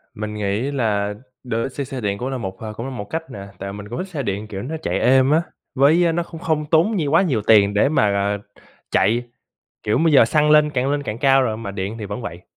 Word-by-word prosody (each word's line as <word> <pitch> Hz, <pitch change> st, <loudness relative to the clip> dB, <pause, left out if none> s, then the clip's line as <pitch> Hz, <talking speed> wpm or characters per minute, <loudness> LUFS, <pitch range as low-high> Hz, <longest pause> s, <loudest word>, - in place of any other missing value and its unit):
Mình 105 Hz, 0 st, -5 dB
nghĩ 105 Hz, +6 st, -1 dB
là 105 Hz, -6 st, 0 dB, 0.3 s
đổi 115 Hz, 0 st, -2 dB
xe 140 Hz, +2 st, -4 dB
xe 130 Hz, -1 st, -6 dB
điện 100 Hz, -2 st, -1 dB
cũng 125 Hz, +5 st, -4 dB
là 135 Hz, -, -3 dB
một 95 Hz, -5 st, -5 dB, 0.2 s
cũng 115 Hz, -, -6 dB
là 135 Hz, -, -5 dB
một 120 Hz, -6 st, -5 dB
cách 160 Hz, -1 st, -4 dB
nè, 100 Hz, -4 st, -8 dB
tại 100 Hz, 0 st, -5 dB
mình 105 Hz, 0 st, -9 dB
cũng 120 Hz, -, -5 dB
thích 190 Hz, -, -4 dB
xe 155 Hz, -6 st, -4 dB
điện 100 Hz, -1 st, -3 dB
kiểu 100 Hz, -2 st, -6 dB
nó 145 Hz, +9 st, -5 dB
chạy -, -, -1 dB
êm 130 Hz, +1 st, +4 dB
á, 160 Hz, +2 st, +4 dB, 0.3 s
với 160 Hz, +5 st, +4 dB
nó 170 Hz, +1 st, 0 dB
cũng 165 Hz, -1 st, -10 dB
không 155 Hz, -2 st, 0 dB
tốn 165 Hz, +7 st, +3 dB
nh 150 Hz, -4 st, -1 dB
quá 165 Hz, -, +6 dB
nhiều 140 Hz, -, 0 dB
tiền 105 Hz, -2 st, +5 dB
để 105 Hz, +7 st, +3 dB
mà, 105 Hz, -9 st, +2 dB
ờ, 100 Hz, +1 st, 0 dB, 0.5 s
chạy. 115 Hz, +5 st, +2 dB, 0.6 s
Kiểu 105 Hz, -, +1 dB
bây 160 Hz, -1 st, +3 dB
giờ, 135 Hz, -, +7 dB
xăng 150 Hz, +5 st, +2 dB
lên 150 Hz, 0 st, +5 dB
càng 135 Hz, -1 st, -1 dB
lên 145 Hz, 0 st, -1 dB
càng 105 Hz, -4 st, -4 dB
cao 135 Hz, +1 st, +4 dB
rồi 110 Hz, -4 st, -1 dB
mà 105 Hz, -3 st, -6 dB
điện 100 Hz, +2 st, -4 dB
thì 110 Hz, -, -6 dB
vẫn 100 Hz, +4 st, -5 dB
vậy. 90 Hz, -6 st, -7 dB
125 Hz, 260 wpm, -21 LUFS, 105-150 Hz, 0.6 s, giờ